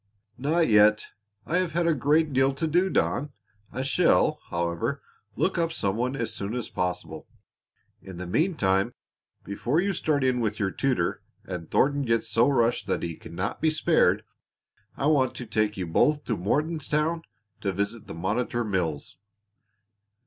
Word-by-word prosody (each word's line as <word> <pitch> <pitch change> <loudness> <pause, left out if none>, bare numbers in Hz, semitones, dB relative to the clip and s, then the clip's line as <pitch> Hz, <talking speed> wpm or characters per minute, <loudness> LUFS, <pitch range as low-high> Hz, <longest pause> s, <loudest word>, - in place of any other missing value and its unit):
"Not 160 +5 +2
yet. 105 0 +5 0.4
I 170 - 0
have 180 -3 0
had 170 +1 +1
a 165 - +3
great 150 +2 +2
deal 135 +1 +3
to 160 - -1
do, 175 +5 +2
Don. 145 -5 0 0.4
I 130 - -3
shall, 155 +1 +3
however, 85 0 -2 0.4
look 185 -1 0
up 165 -1 +1
some 100 -10 -1
one 125 +4 -1
as 115 -4 -3
soon 100 +4 -4
as 125 - -3
possible. 90 -3 -4 0.7
In 95 -2 -10
the 90 - -5
meantime, 100 - +1 0.5
before 120 +9 -1
you 195 +2 +1
start 150 -5 0
in 130 -1 +2
with 105 -2 -1
your 95 -3 0
tutor, 135 +3 0 0.2
and 90 -3 -6
Thornton 145 +1 +2
gets 115 -3 0
so 115 +4 +3
rushed 120 -4 +1
that - - -1
he 85 -1 -3
cannot 90 +6 -5
be 160 - +3
spared, 155 - +2 0.7
I - - -1
want 130 -4 +3
to 125 - -6
take 110 -1 0
you 95 - -2
both 145 - +2
to 115 - -1
Mortonstown 150 - 0 0.4
to 100 -3 -1
visit 100 +4 -3
the - - -7
Monitor 110 +7 -1
Mills. 85 -8 -3
120 Hz, 165 wpm, -26 LUFS, 100-150 Hz, 0.7 s, yet